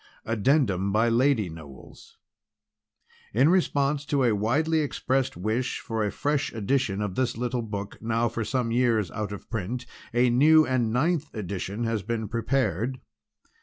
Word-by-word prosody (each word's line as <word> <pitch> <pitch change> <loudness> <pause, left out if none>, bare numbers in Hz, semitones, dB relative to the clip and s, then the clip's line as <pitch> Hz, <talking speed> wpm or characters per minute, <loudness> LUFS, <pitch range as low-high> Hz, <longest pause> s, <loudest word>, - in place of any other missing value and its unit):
Addendum 110 - +1
by 110 +3 +3
Lady 120 -3 +2
Knowles 80 -5 -12 1.2
In 135 +6 +5
response 145 -5 +1
to 140 -2 +1
a 120 -3 +3
widely 145 +10 +1
expressed 135 - -1
wish 110 +7 -1
for 115 -2 -2
a 105 - -1
fresh 145 0 -1
edition 110 -2 0
of 100 -3 -3
this 125 +1 -1
little 125 0 -1
book 105 -2 -6
now 115 +1 +1
for 115 0 -3
some 120 +1 -1
years 115 -4 +2
out 105 -2 -4
of 100 - -8
print 115 +3 -3 0.3
a 120 +1 +3
new 155 +5 +6
and 120 -4 0
ninth 150 +5 0
edition 100 +2 -4
has 115 -2 -1
been 110 +1 -3
prepared. 120 0 -1
115 Hz, 150 wpm, -26 LUFS, 105-135 Hz, 1.2 s, new